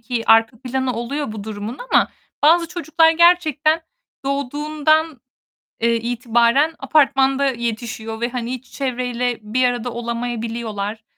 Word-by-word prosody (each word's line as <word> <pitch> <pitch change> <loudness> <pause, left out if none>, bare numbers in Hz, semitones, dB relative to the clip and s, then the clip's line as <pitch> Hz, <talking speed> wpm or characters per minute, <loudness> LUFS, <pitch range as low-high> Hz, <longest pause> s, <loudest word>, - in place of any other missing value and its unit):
ki 230 0 -3
arka 225 +1 +4
planı 260 0 -2
oluyor 240 +2 -4
bu 210 -2 -7
durumun 215 +4 -6
ama - - +4 0.3
bazı 335 +2 +5
çocuklar 325 -2 +2
gerçekten 325 -2 +3 0.4
doğduğundan, 295 +2 0 0.6
eee, 235 0 +3
itibaren 240 +5 +1
apartmanda 275 -2 +3
yetişiyor 225 -2 -5
ve 240 - 0
hani 245 -1 -4
hiç 255 0 -7
çevreyle 250 -2 -2
bir 220 +5 -1
arada 245 0 -1
olamayabiliyorlar. 230 -3 -4
245 Hz, 120 wpm, -20 LUFS, 230-290 Hz, 0.6 s, bazı